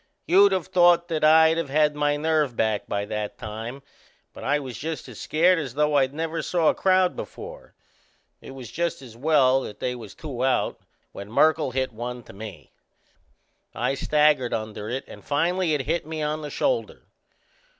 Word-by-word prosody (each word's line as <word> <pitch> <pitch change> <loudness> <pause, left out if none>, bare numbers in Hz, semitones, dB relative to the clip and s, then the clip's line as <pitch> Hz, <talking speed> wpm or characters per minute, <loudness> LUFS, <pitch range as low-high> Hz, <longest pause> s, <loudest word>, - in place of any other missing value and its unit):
You'd 195 +3 +6
of 185 -3 0
thought 175 -2 +4
that 160 -2 -2
I'd 160 +1 +6
of 165 - -3
had 150 +1 +3
my 145 0 0
nerve 150 -4 +1
back 110 -2 0
by 100 0 -2
that 105 0 -4
time; 115 +4 -7 0.5
but - - -10
I 145 +2 +2
was 130 -4 -6
just 160 +1 -5
as - - -11
scared 175 +3 +3
as 135 -5 -5
though 150 0 +2
I'd 135 -2 +3
never 165 +2 -3
saw 170 -3 +2
a - - +3
crowd 185 -1 +2
before. - - -9 0.7
It 135 - -10
was 125 -4 -9
just 170 -1 -2
as 120 -3 -12
well 135 -1 +3
that 105 - -8
they 125 - -2
was 115 -5 -10
two 135 -6 -5
out 130 -1 0 0.3
when 100 +1 -9
Merkle 155 +4 +3
hit 130 +1 -2
one 120 +2 -6
to - - -14
me. 100 -5 -10 1.0
I - - 0
staggered 150 -2 +2
under 110 -1 -5
it 130 +3 -3
and - - -12
finally 165 +3 +1
it 145 - -1
hit 170 +6 -1
me 155 -1 -4
on 150 +1 -2
the 150 - -6
shoulder. - - -2
150 Hz, 185 wpm, -24 LUFS, 125-160 Hz, 1.0 s, You'd